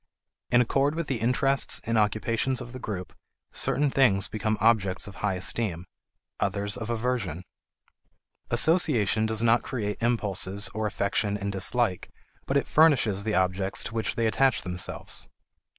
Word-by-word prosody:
In 120 - +5
accord 135 +5 +1
with 170 0 -2
the 135 -5 -3
interests 130 +4 +1
and 115 0 -1
occupations 110 +4 +1
of 120 -1 -8
the 130 - -7
group, 95 -7 -6 0.4
certain 145 0 +1
things 105 -9 +3
become 110 0 -2
objects 100 -5 +2
of 100 - -10
high 95 -2 -1
esteem; 90 -2 -1 0.5
others 100 +1 -1
of 120 -2 -6
aversion. 110 -8 -2 1.1
Association 120 - +3
does 110 +1 -1
not 115 +1 +4
create 105 -5 -4
impulses 100 -4 0
or 110 0 -1
affection 100 +1 -1
and 100 0 -3
dislike, 100 +1 -1 0.4
but 135 - +1
it 140 - 0
furnishes 130 -11 +3
the 110 - 0
objects 95 +1 0
to - - -6
which 115 -1 -1
they 115 - 0
attach 115 -1 +2
themselves. 90 0 -4
110 Hz, 150 wpm, -26 LUFS, 100-125 Hz, 1.1 s, In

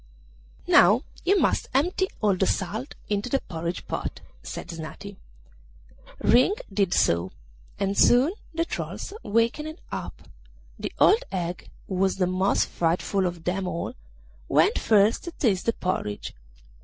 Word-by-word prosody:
'Now - - +6 0.2
you 390 +3 +3
must - - +1
empty 360 +7 +2
all 205 -3 +3
the 190 +1 +1
salt 215 +8 -2
into 205 +3 -1
the 275 - +2
porridge 170 -3 -5
pot,' - - -4 0.2
said - - -7
Snati. 165 +5 -8 1.0
Ring 255 - +4 0.2
did 195 -3 +1
so, 85 - +2 0.5
and 195 0 0
soon 255 - +5 0.2
the 330 0 -1
trolls 395 - -5
wakened 235 +9 0
up. - - -6 0.6
The - - -4
old 450 +4 +5
hag, 175 -1 -4 0.2
who - - -5
was 190 +1 +1
the 190 - +1
most 185 +2 +1
frightful 180 +3 0
of 175 -2 -6
them 185 +2 -1
all, 170 - -3 0.5
went - - +3
first 210 0 +3
to 345 - -5
taste 210 - 0
the 230 - +3
porridge. 145 - -3
195 Hz, 140 wpm, -26 LUFS, 180-245 Hz, 1.0 s, Now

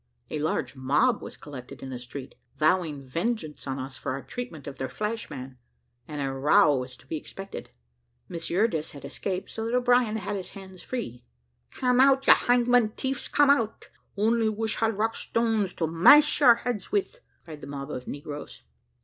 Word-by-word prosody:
A - - -2
large 155 -1 -1
mob 145 - +2
was - - -9
collected 140 -2 -10
in 135 - -6
the 125 - -5
street, 130 +2 -8 0.2
vowing 155 -3 +1
vengeance 165 - -3
on 135 0 -2
us 130 0 -6
for 140 - -3
our 135 - -5
treatment 245 - -7
of 140 -2 -8
their 130 - -3
flash 215 +1 -3
man, 130 -1 -8 0.5
and 150 -1 -6
a 135 -1 -1
row 150 +4 +4
was 125 -1 -5
to - - -20
be 155 +4 -4
expected. 195 +5 -8 0.6
Miss 165 -1 -5
Eurydice 175 -4 0
had 140 - -10
escaped, 185 -2 -4
so 225 - -4
that 235 - 0
O'Brien 245 -3 +3
had 205 0 -3
his 190 -2 -5
hands 190 -2 -11
free. 125 - -5 0.5
"Cam 250 -1 +1
out, 270 0 +5
you - - +10
hangman 245 -2 +3
tiefs, 265 +1 -3
cam 290 -1 +5
out! 230 -6 0 0.3
only 225 +2 +2
wish 220 +1 -1
had 225 -2 0
rock 225 +2 0
stones 225 -4 0
to 165 - 0
mash 185 - +6
your 250 -6 +8
heads 235 -4 -4
with," 415 +5 -1 0.3
cried 155 -3 -10
the - - -8
mob 140 +1 -6
of 125 -3 -6
negroes. 145 - -7
185 Hz, 185 wpm, -27 LUFS, 140-230 Hz, 0.6 s, you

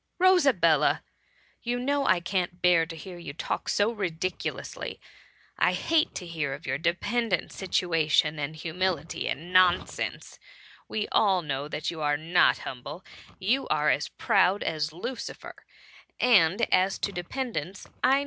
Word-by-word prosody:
" - - -50
Rosabella! 180 - +3 0.6
you 240 +1 -2
know 280 +2 0
I 185 -2 +3
can't 180 -1 -2
bear 175 -2 +4
to 165 - -8
hear 175 +2 -9
you 155 -4 -7
talk - - -3
so 205 +2 +2
ridiculously 185 -4 -4 0.3
— - - -26
I - - +3
hate 325 -1 +1
to 180 - -5
hear 160 -5 -3
of 150 - -14
your 130 0 -2
dependant 185 +4 0
situation, 160 -5 +1
and 145 +2 -3
humility, 165 0 -2
and 175 +5 -5
nonsense; 185 -1 +1 0.5
we 215 - -2
all 190 -4 +3
know 140 -1 -3
that 150 0 -3
you 160 -2 -7
are 145 -1 +1
not 165 +4 +3
humble, 140 +7 -8 0.3
you 230 +8 0
are 150 0 +2
as 150 - -1
proud 195 0 +2
as 155 -2 -1
I^ucifer; 180 +10 -7 0.7
and 205 -4 +4
as 185 +1 +3
to 200 - -2
dependance, 190 - -4 0.2
I - - +5
THB - - +4
MUMMY. 275 - +4
175 Hz, 155 wpm, -27 LUFS, 155-200 Hz, 0.7 s, I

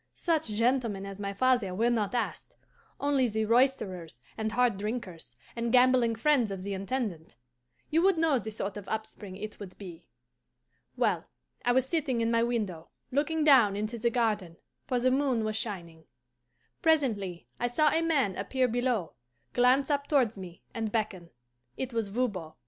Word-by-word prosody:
Such 320 -4 0
gentlemen 225 -2 0
as 195 0 -8
my 200 -1 -3
father 230 -3 +1
were 230 +4 +2
not 220 -1 0
asked; 240 - -3 0.4
only 280 -3 +2
the 220 -1 -1
roisterers 210 - +1 0.2
and 220 0 -2
hard 245 -3 +2
drinkers, 195 - -5 0.2
and 235 0 -1
gambling 250 -2 +4
friends 250 -1 +3
of 195 -2 -5
the 200 0 -3
Intendant. 195 - -3 0.6
You 325 +2 +3
would 380 -1 +4
know 320 -5 +3
the 220 - -5
sort 205 -2 -4
of 205 - -9
upspring 215 -3 -5
it 215 +2 -7
would 190 -3 -9
be. 175 -4 -10 0.9
Well, - - +1 0.4
I 245 - +3
was 260 +1 +2
sitting 275 -6 0
in 230 0 +1
my 230 0 +3
window, 210 -9 -2 0.2
looking 305 +4 +1
down 250 -9 +6
into 215 +3 -3
the 235 +2 +2
garden; 210 -8 -1 0.3
for 250 - +1
the 255 +1 +2
moon 260 -4 +1
was 215 0 -2
shining. 170 -8 -5 0.8
Presently 225 - +1
I 245 - +1
saw 300 +5 +3
a 325 - +2
man 280 - +1
appear 260 -1 0
below, 245 -6 -1 0.4
glance 255 +4 +3
up 285 0 0
towards 255 -7 +2
me, 180 -3 -10
and 225 -2 -3
beckon. 205 -6 -2 0.5
It 260 -2 -4
was 225 -2 -1
Voban. 200 -7 -2
230 Hz, 165 wpm, -29 LUFS, 200-255 Hz, 0.9 s, down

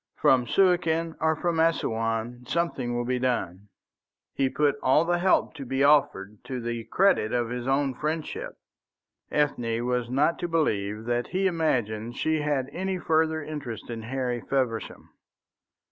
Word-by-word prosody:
From 125 -2 +3
Suakin 170 -1 +2
or 160 0 +2
from 170 +1 -1
Assouan 120 -6 0
something 135 -7 -1
will 120 0 -1
be 125 +1 0
done." 105 -6 -2 0.6
He 135 -1 +1
put 145 +1 +1
all 135 +5 +4
the 175 0 +1
help 185 -2 +2
to 145 -4 -7
be 135 +1 0
offered 105 -9 +2
to 130 -1 -4
the 120 -1 -4
credit 185 - +2
of 120 -2 0
his 125 0 -4
own 135 0 +1
friendship. 155 +4 -4 0.7
Ethne 120 -6 0
was 125 -1 -1
not 145 +6 +1
to 175 - -2
believe 110 -10 -1
that 120 0 -1
he 190 +2 -1
imagined 120 - 0
she 155 -1 0
had 145 -3 0
any 190 +1 -2
further 160 -2 +1
interest 140 -7 -6
in 115 -1 -5
Harry 125 0 -2
Feversham. 125 -4 -2
135 Hz, 150 wpm, -26 LUFS, 120-160 Hz, 0.7 s, all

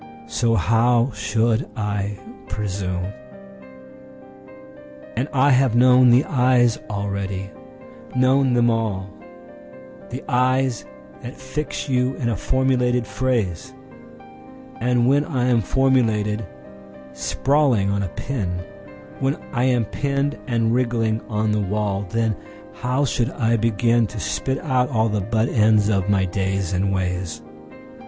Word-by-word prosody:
So 95 +10 0
how 115 +6 +2
should 110 +3 0
I 105 -1 -2 0.3
presume? 95 -1 -3 2.0
And 130 - -1
I 140 +1 +3
have 130 -2 +3
known 125 +1 +6
the 125 +3 +5
eyes 125 -3 +3
already, 100 -1 -3 0.6
known 130 0 +3
them 120 -1 +3
all—The 85 -11 -7
eyes 130 0 +1 0.4
that 120 - -8
fix 130 +4 -4
you 130 -1 +1
in 120 - -2
a 115 - 0
formulated 125 +1 +1
phrase, 125 -1 -2 1.0
And 125 -1 +2
when 140 +2 +3
I 130 -4 -1
am 120 -2 +3
formulated, 115 -3 +1 0.7
sprawling 105 - +1
on 100 0 0
a 100 - -1
pin, 90 -7 -4 0.6
When 135 +2 0 0.2
I 120 0 +1
am 125 -3 +2
pinned 140 +5 -1
and 115 -1 +1
wriggling 115 -3 0
on 105 0 0
the 105 - +1
wall, 100 0 -2
Then 115 0 0 0.4
how 125 +3 -1
should 120 -1 0
I 115 -3 +1
beginTo 115 0 +1
spit 130 0 -2
out 130 -5 +1
all 115 -4 +1
the 105 -1 -1
butt 110 +4 0
ends 110 -2 +3
of 100 -2 0
my 100 -2 +3
days 95 0 -2
and 95 +2 0
ways? 90 -4 -3
115 Hz, 120 wpm, -22 LUFS, 100-125 Hz, 2.0 s, known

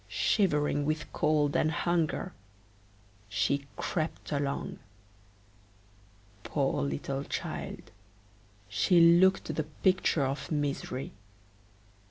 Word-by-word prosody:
Shivering 150 -8 +1
with 155 0 -2
cold 150 -1 +2
and 155 - +3
hunger, 170 +2 -1 1.0
she 140 +6 0
crept 160 -2 -3
along; 140 -1 -2 1.6
poor - - -1
little 70 - -2
child, - - -5 0.8
she 100 - +3
looked 170 +3 +5
the 155 - -1 0.2
picture 185 -6 +3
of 135 +5 -4
misery. 140 -3 -2
150 Hz, 85 wpm, -30 LUFS, 140-170 Hz, 1.6 s, looked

